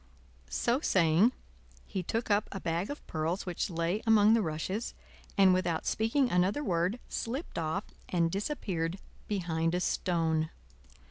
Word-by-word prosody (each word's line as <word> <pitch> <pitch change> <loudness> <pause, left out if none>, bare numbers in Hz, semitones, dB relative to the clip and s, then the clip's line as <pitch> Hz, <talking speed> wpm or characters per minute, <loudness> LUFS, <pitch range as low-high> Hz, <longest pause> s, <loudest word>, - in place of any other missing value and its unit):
So 235 - +1
saying, 180 - +4 0.5
he 190 - -3
took 225 +5 -2
up 205 +1 +2
a 195 - -4
bag 170 +2 -1
of 290 - -7
pearls 160 +4 -2
which 180 +2 -2
lay 170 +4 -1
among 215 -1 +6
the 230 - +4
rushes, 185 +6 -3 0.4
and 190 -2 +7
without 175 -3 0
speaking 240 +4 +1
another 185 +11 +2
word, 180 0 +1
slipped 255 - -4
off 165 +5 -1 0.3
and 170 -2 +2
disappeared 190 - -2 0.3
behind 170 -4 0
a - - +1
stone. 165 -3 0
185 Hz, 140 wpm, -31 LUFS, 165-215 Hz, 0.5 s, and